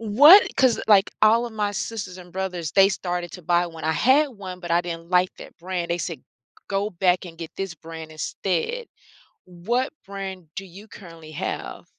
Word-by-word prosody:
What 290 - +8
'cause, 260 -3 +3
like, 205 -2 +5
all 225 +2 +5
of 235 - -6
my 210 -2 -1
sisters 200 -3 -5
and 180 -1 -13
brothers, 180 -4 -3
they 195 0 +6
started 175 -3 -3
to 180 - -9
buy 175 +2 +2
one. 165 -2 -10
I 160 - +1
had 270 - +4
one, 190 -6 -9
but 175 -2 -7
I 170 - +4
didn't 170 0 -7
like 180 0 +3
that - - -12
brand. 175 -1 -4
They 170 - 0
said 170 -2 -5 0.5
go 200 +1 0
back 180 0 +1
and 165 -2 -11
get 165 -2 -7
this 195 -3 -4
brand 160 0 -10
instead. 190 - -2 0.6
What 225 +10 -2
brand 190 -3 -7
do 195 - -4
you 195 +4 -13
currently 165 -5 -12
have? 145 - -5
185 Hz, 190 wpm, -24 LUFS, 170-205 Hz, 0.6 s, What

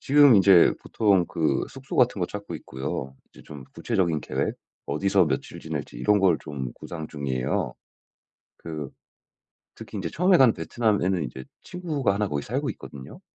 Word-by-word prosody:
지금 145 -2 +6
인제 95 -3 +6
보통 100 -5 +2
그 80 -2 0
숙소 135 0 -9
같은 125 -5 +3
거 90 - +1
찾고 100 +2 -7
있고요. 65 0 -5
이제 - - -17
좀 70 -3 -10
구체적인 85 -5 0
계획 - - -2 0.3
어디서 95 +5 +2
며칠 75 - -3
지낼지 - - -5
이런 105 +12 +3
걸 95 -5 +3
좀 65 -4 -6
구상 80 -2 -7
중이에요. 65 -4 -2 0.8
그 75 -4 -6 0.9
특히 - - -10
인제 - - -3
처음에 180 +3 +3
간 130 -5 +6
베트남에는 100 -7 0
이제 65 -2 -7 0.2
친구가 155 - -1
하나 105 +1 0
거기 70 -5 -2
살고 - - -2
있거든요. 65 -1 -11
90 Hz, 330 characters per minute, -25 LUFS, 70-110 Hz, 0.9 s, 지금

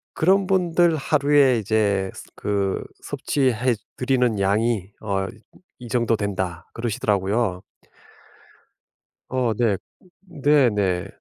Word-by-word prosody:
"그런 190 +3 +3
분들 175 -3 +3
하루에 140 -3 +3
이제 100 -2 0 0.2
그 100 -2 -1 0.2
섭취해 125 -3 0 0.2
드리는 125 -4 +1
양이 105 0 0
어 100 -2 -1 0.5
이 120 - -8
정도 115 -1 +1
된다." 95 -5 -3
그러시더라고요. 105 -4 -1 1.7
어 125 -3 +1
네. 105 -3 +1 0.4
네 145 -7 +3
네. 95 -3 0
115 Hz, 185 characters per minute, -23 LUFS, 100-135 Hz, 1.7 s, 그런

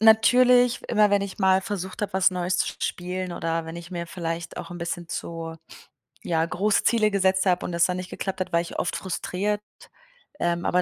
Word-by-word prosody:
natürlich, 245 +3 +6
immer 210 -2 +4
wenn 200 -1 +4
ich 200 -1 -6
mal 190 -1 +4
versucht 190 -2 -5
habe, 205 - -2
was 190 0 +4
Neues 180 0 -1
zu - - +1
sp - - -23
spielen, 180 0 -3
oder 165 -1 -2
wenn 165 +1 -7
ich 170 +1 -9
mir 170 -1 -4
vielleicht 165 -1 -5
auch - - -6
'n 175 - -7
bisschen 170 0 -4
zu, 165 -1 -5 0.7
ja, 165 -1 +1
große 195 +5 +1
Ziele 215 -3 +3
gesetzt 190 -1 +2
habe 180 -2 +2
und - - -3
das 170 0 +3
dann 180 0 -1
nicht 185 0 -6
geklappt 190 -1 -4
hat, 185 - -3
war 170 - +4
ich 170 - -6
oft 175 - -1
frustriert. 200 +2 -2 0.8
Ähm, 175 0 0
aber 180 0 +3
185 Hz, 210 wpm, -25 LUFS, 170-200 Hz, 0.8 s, natürlich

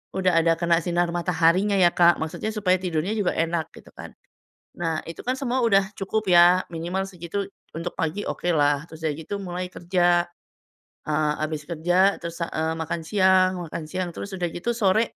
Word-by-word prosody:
udah 185 -3 +3
ada 165 0 +3
kena 170 0 +2
sinar 175 0 0
mataharinya, 175 +3 +2
ya, 180 -3 +5
Kak, 175 0 +5
maksudnya 160 +7 -3
supaya 185 -3 +2
tidurnya 175 0 -2
juga 205 -4 0
enak 165 -1 -1
gitu - - -15
kan. - - -9 0.7
Nah 165 -2 -1
itu, 165 - -8
kan, 255 - +1
semua 260 -1 -1
udah 195 -3 +3
cukup, 210 0 -2
ya, 175 +1 +6
minimal 175 +4 -2
segitu 180 +2 -4 0.3
untuk 165 +2 -4
pagi 165 +4 -2
okelah. 145 -3 +1
Terus 160 -1 -12
udah 155 - +1
gitu 160 +5 -5
mulai 180 -1 -4
kerja. 175 -1 +2 0.8
Eee, 150 0 +1
abis 155 -1 -4
kerja 175 +4 +2
terus, 170 0 -6
eee, 160 0 -2
makan 160 +1 -3
siang 185 -1 +4
makan 160 0 -6
siang 185 -1 -2
terus 200 - -6
udah 175 -1 -1
gitu 175 +7 -3
sore, 215 -1 +3
175 Hz, 175 wpm, -24 LUFS, 165-190 Hz, 0.8 s, ya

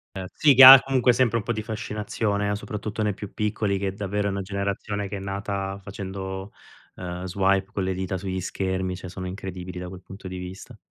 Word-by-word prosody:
Ehm, 95 - -5
sì 145 -3 +4
che 130 +1 +9
ha, 130 0 +13
comunque, 130 -2 +2
sempre 120 -1 +2
un 105 - -3
po' 120 - -1
di 110 0 -4
fascinazione, 105 -1 -2
a 100 - 0
soprattutto 105 +1 -5
nei 105 -2 0
più 105 - -8
piccoli 105 -2 -1
che, 95 -1 -2
davvero, 100 0 -2
è - - 0
una 100 0 -2
generazione 100 +1 -3
che 100 +1 -5
è - - -6
nata 100 0 -4
facendo, 95 0 -6 0.5
ehm, 90 0 -6
swipe 95 +1 +1
con 100 -3 -2
le 95 0 -1
dita 95 0 -3
sugli 95 0 -4
schermi, 95 0 -2
cioè 90 0 -8
sono 95 +1 -7
incredibili 90 -1 -6
da 90 - -6
quel 95 0 -11
punto 95 -1 -10
di 90 0 -6
vista. 90 +1 -9
100 Hz, 215 wpm, -25 LUFS, 95-105 Hz, 0.5 s, ha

